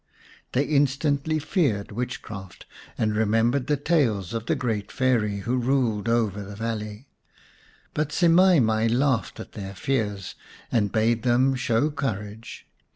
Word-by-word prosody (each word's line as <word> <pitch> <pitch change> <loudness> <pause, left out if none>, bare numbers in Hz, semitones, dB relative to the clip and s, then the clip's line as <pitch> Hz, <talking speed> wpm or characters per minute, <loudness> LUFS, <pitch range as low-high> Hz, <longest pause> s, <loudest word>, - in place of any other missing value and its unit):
They 130 - +3
instantly 145 +1 +1
feared 145 - 0
witchcraft, 105 -5 -6 0.3
and 110 - +1
remem 110 +2 +2
bered 140 -3 -1
the 150 -1 +2
tales 125 - +1
of 115 0 -4
the 160 - +2
great 115 -7 -2
Fairy 115 -6 +1
who 120 +6 -1
ruled 120 -4 +1
over 110 -4 +1
the 100 +1 -8
valley. 110 +1 -4 0.9
But 150 -1 -1
Semai 175 +1 +5
mai 110 0 +2
laughed 125 +1 +1
at - - -8
their 100 -2 -7
fears, 105 -6 -2 0.4
and 105 -4 +1
bade 115 +1 +2
them 125 +2 +3
show 130 +2 +1
courage. 110 -5 -5
115 Hz, 140 wpm, -25 LUFS, 105-140 Hz, 0.9 s, Semai